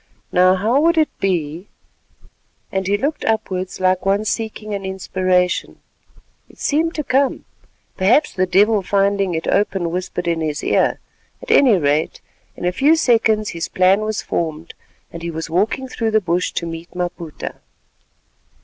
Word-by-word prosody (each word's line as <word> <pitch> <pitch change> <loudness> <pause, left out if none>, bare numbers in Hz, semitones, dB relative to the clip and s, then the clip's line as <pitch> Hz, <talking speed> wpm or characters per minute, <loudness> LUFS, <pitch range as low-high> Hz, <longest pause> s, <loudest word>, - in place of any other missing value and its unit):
"Now, 185 +1 +5
how 225 +9 +2
would 335 +1 +3
it 310 -1 +2
be——" 175 -1 -2 1.0
and 190 -1 -2
he 200 +1 +2
looked 285 +8 -2
upwards 190 -4 -2
like 185 0 +1
one 200 +2 +1
seeking 215 -1 -3
an 200 -1 -4
inspiration. 185 -1 -1 0.7
It - - -19
seemed 325 +3 0
to 300 - -2
come; 270 0 0 0.5
perhaps 230 +11 +3
the 185 0 0
devil 205 +3 +3
finding 195 -1 +1
it 160 - -3
open 195 -4 0
whispered 180 0 -4
in 165 -1 0
his 155 -1 -3
ear, - - +1 0.4
at - - -3
any 270 - +6
rate—in 150 +3 -3
a 180 - +2
few 275 - +4
seconds 225 -7 +2
his 165 -1 -4
plan 185 +3 +3
was 215 0 -2
formed, 160 0 -3 0.4
and 170 - -7
he 170 - -4
was 160 0 -5
walking 215 +9 0
through 230 -3 -2
the 220 0 +3
bush 180 -2 -1
to 170 - -2
meet 165 +1 -8
Maputa. 175 -3 -5
190 Hz, 155 wpm, -19 LUFS, 175-220 Hz, 1.0 s, any